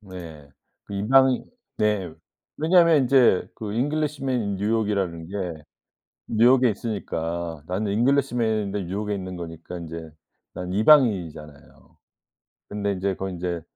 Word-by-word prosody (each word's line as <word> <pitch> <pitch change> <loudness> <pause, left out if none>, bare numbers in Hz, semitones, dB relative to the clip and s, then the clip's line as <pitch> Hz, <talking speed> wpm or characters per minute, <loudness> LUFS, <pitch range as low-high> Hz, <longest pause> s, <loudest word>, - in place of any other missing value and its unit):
네. 85 -7 -10 0.4
그 100 - -8
이방인 130 +5 +3 0.3
네. 105 -5 0 0.4
왜냐면 165 -2 +5
인제 125 -7 +4
그 105 -2 -6
Englishman 140 0 -1
in 100 -2 -2
New 100 +3 -1
York이라는 100 -7 -1
게 90 -5 -5 0.6
뉴욕에 125 +2 +4
있으니까 85 -7 -4
나는 100 +4 -2
잉글리시맨인데 110 -5 +1
뉴욕에 105 +4 -3
있는 95 -2 -6
거니까 85 0 -8
인제 80 -1 -8 0.4
난 90 0 -5
이방인이잖아요. 95 - +1 0.7
근데 100 -1 -2
인제 95 +1 -1
그건 95 +1 -4
인제 85 -1 -3
100 Hz, 335 characters per minute, -24 LUFS, 90-120 Hz, 0.7 s, 왜냐면